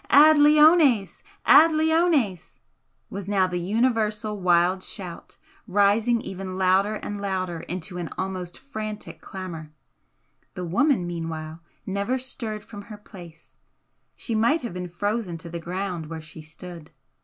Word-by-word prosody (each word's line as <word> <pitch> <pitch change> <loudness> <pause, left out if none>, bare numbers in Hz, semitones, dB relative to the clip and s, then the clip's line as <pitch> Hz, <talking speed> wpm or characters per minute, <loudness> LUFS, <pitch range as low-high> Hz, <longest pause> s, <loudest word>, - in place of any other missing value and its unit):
"Ad 305 +2 +7
leones! 300 - +5 0.2
Ad 325 +1 +8
leones!" 310 - +1 0.5
was 200 -1 -6
now 195 -2 +3
the 180 -1 -2
universal 215 +1 0
wild 180 +1 +3
shout, 185 -3 -8 0.3
rising 210 +4 +2
ever 190 0 -6
louder 190 +2 +1
and 205 -1 -5
louder 185 -4 -2
into 180 +2 -6
an 170 - -4
almost 185 -2 -4
frantic 215 -6 -7
clamour. 170 -5 -8 0.8
The 180 - -4
woman 235 - +2
meanwhile 165 -1 -5 0.2
never 200 +6 -1
stirred 225 -4 -5
from 205 -2 -10
her 210 - -8
place 175 -6 -14 0.6
she 235 - -4
might 235 +8 +2
have 235 - -4
been 180 0 -5
frozen 205 0 -2
to 165 0 -10
the 170 - -4
ground 180 -1 -4
where 165 0 -6
she 155 +1 -11
stood. 160 +1 -11
195 Hz, 135 wpm, -25 LUFS, 175-225 Hz, 0.8 s, Ad